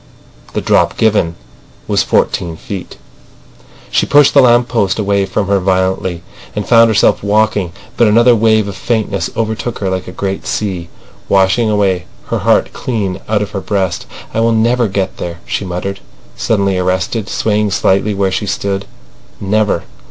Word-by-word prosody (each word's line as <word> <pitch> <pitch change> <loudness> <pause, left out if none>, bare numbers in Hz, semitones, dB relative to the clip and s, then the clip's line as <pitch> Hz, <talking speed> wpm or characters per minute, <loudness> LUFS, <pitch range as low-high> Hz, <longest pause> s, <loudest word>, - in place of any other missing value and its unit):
"The - - -1
drop - - +2
given 105 -7 +2 0.5
was - - +2
fourteen 85 -2 0
feet." 95 0 -7 0.9
She - - +1
pushed 145 -1 +5
the 140 - +7
lamp 120 -1 +4
post 100 -7 0
away 100 -2 +1
from 100 +2 -1
her 100 0 +2
violently, 95 -2 0 0.3
and 105 - -3
found 115 -1 +6
herself 110 -2 +3
walking. 105 -3 +1 0.3
But 120 - +4
another 120 +3 +5
wave 110 -1 +3
of 100 - -6
faintness 105 -1 -1
overtook 110 +1 -2
her 95 -2 -2
like 95 0 -3
a - - -6
great 95 +1 -4
sea, 95 -5 -3 0.4
washing 100 +4 +3
away 95 -4 +1 0.2
her - - 0
heart - - +2
clean 105 -7 -3
out 105 -1 +1
of 105 - -7
her 100 - -4
breast. 95 -4 -2 0.3
"I - - 0
will 115 0 +3
never 115 +2 +2
get 95 -1 -2
there," 85 -1 -5
she 100 - -3
muttered, 95 +2 -4 0.4
suddenly 100 -4 0
arrested, 95 +4 -1
swaying 105 -1 0
lightly 100 +2 +2
where 95 -1 0
she 100 +3 -2
stood. 100 0 -2 0.5
"Never." 105 -3 0
100 Hz, 160 wpm, -14 LUFS, 95-110 Hz, 0.9 s, the